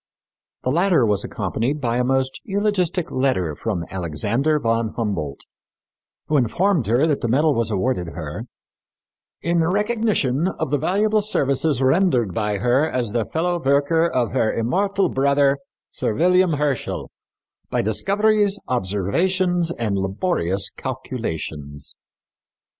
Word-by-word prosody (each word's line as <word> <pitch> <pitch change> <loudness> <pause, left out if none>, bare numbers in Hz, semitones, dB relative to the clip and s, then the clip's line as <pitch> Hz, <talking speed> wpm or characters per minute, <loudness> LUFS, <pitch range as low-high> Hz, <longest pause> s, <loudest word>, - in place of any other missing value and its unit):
The 130 - 0
latter 170 -4 +3
was 105 -2 +1
accompanied 135 +7 -2
by 120 -3 0
a 125 - +2
most 130 +1 0
eulogistic 195 -4 0
letter 125 - 0
from 95 -5 -3
Alexander 100 - 0
von 115 -3 0
Humboldt, 85 - -3 0.8
who 150 - +1
informed 145 - +1
her 120 +7 +3
that 150 -3 0
the - - 0
medal 145 +6 +3
was 115 -3 0
awarded 100 -3 -1
her 80 +6 -6 1.0
"in 170 -1 +2
recognition 200 - +1
of - - -3
the 145 - +2
valuable 210 +6 +2
services 140 - +1
rendered 130 - +2
by 105 +1 -1
her 125 +9 +2
as 120 -4 -2
the 115 -1 0
fellow 175 +1 -1
worker 145 +5 +3
of 120 - 0
her 110 - +1
immortal 195 - +1
brother, 140 0 +2 0.3
Sir 110 - -2
William 180 +2 +3
Herschel, 145 -3 -2 0.6
by - - 0
discoveries, 205 - +1
observations 165 - 0
and 110 -9 -1
laborious 95 - -1
calculations." 80 - -5
135 Hz, 125 wpm, -22 LUFS, 110-175 Hz, 1.0 s, latter